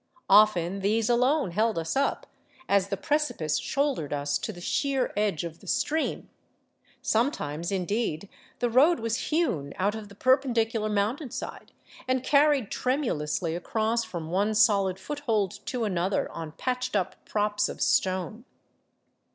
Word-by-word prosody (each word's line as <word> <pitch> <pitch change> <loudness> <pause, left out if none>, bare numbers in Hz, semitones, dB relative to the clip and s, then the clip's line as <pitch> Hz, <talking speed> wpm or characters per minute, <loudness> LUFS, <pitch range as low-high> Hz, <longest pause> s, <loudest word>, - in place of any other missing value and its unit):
Often 195 -3 +5
these 215 +4 +1
alone 255 - +2
held 220 +3 +1
us 165 0 -2
up, 275 +1 0 0.4
as 200 -1 +3
the 195 - -3
precipice 290 - 0
shouldered 275 - -1
us 145 0 -1
to - - -4
the 175 - -11
sheer 270 +7 0
edge 205 -7 0
of 165 -1 -7
the - - -16
stream; 315 +1 -1 0.8
sometimes, 175 - 0
indeed, 195 -2 -1 0.3
the 240 - 0
road 300 +8 +5
was 230 +1 -2
hewn 240 - 0
out 200 +2 +1
of 220 -2 -7
the 200 - -14
perpendicular 230 -3 +2
mountainside 220 +7 -3 0.4
and 255 0 +1
carried 285 -4 +3
tremulously 170 - -1
across 220 +6 0
from 170 -6 -6
one 205 +4 +1
solid 200 -4 +3
foothold 220 -4 -2
to 250 -2 -2
another 190 -2 0
on 160 -2 -7
patched 255 +3 -2
up 190 -2 -2
props 210 0 0
of - - -7
stone. 190 +4 0
215 Hz, 140 wpm, -27 LUFS, 185-255 Hz, 0.8 s, Often